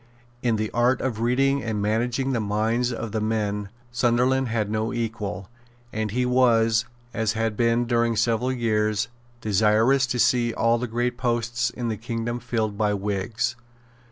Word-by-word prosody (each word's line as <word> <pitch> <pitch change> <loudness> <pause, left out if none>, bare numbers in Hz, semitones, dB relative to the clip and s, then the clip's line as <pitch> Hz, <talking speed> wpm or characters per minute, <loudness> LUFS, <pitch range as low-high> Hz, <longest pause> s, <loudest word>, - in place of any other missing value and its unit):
In 120 -2 +1
the 110 0 -2
art 125 +2 +2
of 125 -5 -2
reading 135 +4 +2
and 110 -3 -2
managing 120 +6 0
the 120 - +1
minds 110 +4 0
of 115 -2 -5
men 105 -2 -1 0.2
Sunderland 125 +2 +2
had 110 -2 -1
no 110 +1 -1
equal; 110 -5 -4 0.5
and 110 0 -1
he 125 +5 0
was, 115 -3 +3 0.3
as 110 -1 0
he 115 - -4
had 110 -1 0
been 115 +1 +2
during 120 -1 +1
several 120 +3 +1
years, 110 -3 0 0.3
desirous 110 +6 +3
to 125 - -2
see 120 0 +2
all 115 +1 +2
the 125 - -2
great 120 +2 -1
posts 120 0 0
in 120 -2 -4
the 110 - -2
kingdom 115 +1 -3
filled 110 -3 -2
by 105 -1 +2
Whigs. 105 +5 -2
115 Hz, 160 wpm, -24 LUFS, 110-120 Hz, 0.5 s, was